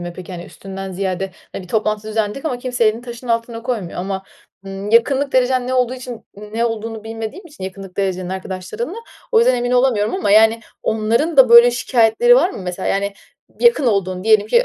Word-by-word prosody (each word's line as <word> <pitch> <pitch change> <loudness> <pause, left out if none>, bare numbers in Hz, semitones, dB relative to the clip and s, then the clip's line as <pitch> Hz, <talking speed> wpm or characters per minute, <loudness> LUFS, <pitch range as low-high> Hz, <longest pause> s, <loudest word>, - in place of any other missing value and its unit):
mi 175 0 -6
peki, 185 0 -9
hani, 175 -1 -7
üstünden 195 0 -8
ziyade, 190 0 -3 0.2
hani, - - -6
"Bir 180 - -14
toplantı 215 0 -1
düzenledik 215 +5 -2
ama 250 -6 -2
kimse 250 -2 -1
elini 215 +2 +2
taşın 240 0 -9
altına 230 0 -2
koymuyor." 225 -10 -4
ama, 190 +1 -3 0.4
ımm, 195 +1 -6
yakınlık 270 +5 +3
derecen 255 0 +2
ne 255 - -1
olduğu 250 0 +1
için 250 -2 -8
ne 210 +3 -3
olduğunu 225 -1 -4
bilmediğim 225 - -6
için 290 - -10
yakınlık 190 0 -8
derecenin 185 -2 -2
arkadaşlarınla, 190 - -5 0.4
o 450 - +6
yüzden 450 - +4
emin 245 0 -1
olamıyorum 245 - +2
ama, 380 - -1
yani, 220 +2 +5 0.2
onların 230 +9 0
da 260 -3 +8
böyle 235 +1 +8
şikâyetleri 245 - +3
var 375 - +3
mı? - - -8
Mesela, 180 +1 -4
yani, 200 +1 0 0.5
yakın 475 - +4
olduğun, 185 -3 0
diyelim 215 -2 +4
ki 475 - +3
225 Hz, 195 wpm, -19 LUFS, 195-250 Hz, 0.5 s, da